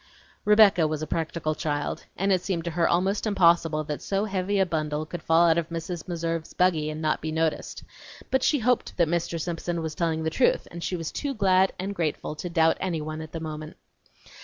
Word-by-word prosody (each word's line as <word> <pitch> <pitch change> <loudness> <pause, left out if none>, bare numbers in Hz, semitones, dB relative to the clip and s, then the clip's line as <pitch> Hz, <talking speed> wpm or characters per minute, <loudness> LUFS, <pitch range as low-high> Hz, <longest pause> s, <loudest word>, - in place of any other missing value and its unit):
Rebecca 210 -6 +6
was 155 0 -3
a - - -1
practical 160 0 -2
child, 145 -1 -3
and 195 +1 +1
it 185 -2 +3
seemed 180 -3 -2
to 170 - -3
her 170 +1 +1
almost 190 +5 +1
impossible 170 -5 +3
that 150 -1 -5
so 195 +1 -1
heavy 195 0 -1
a 190 - +4
bundle 155 -2 -2
should 175 - -5
fall 165 +2 +4
out 165 0 +4
of 165 -1 -4
Mrs. 165 0 -5
Meserve's 165 -2 -3
buggy 165 -4 +2
and 155 +1 -5
not 155 0 +1
be 155 - -3
noticed; 160 0 -2 0.5
but 265 - +3
she 295 - +3
hoped 250 -1 0
that 170 -2 +3
Mr. 170 0 -1
Simpson 170 +1 -3
was 160 -1 -3
telling 160 -1 -1
the 160 - -1
truth, 255 - +2
and 170 0 -7
she 185 - -2
was 165 -2 -4
too 280 -2 -3
glad 190 -2 +3
and 195 +2 -3
grateful 160 -5 -2
to 180 - -5
doubt 165 -1 +3
anyone 155 -3 -3
at 160 -1 -9
the 165 - -5
moment. 155 -1 -7
170 Hz, 210 wpm, -26 LUFS, 155-185 Hz, 0.5 s, Rebecca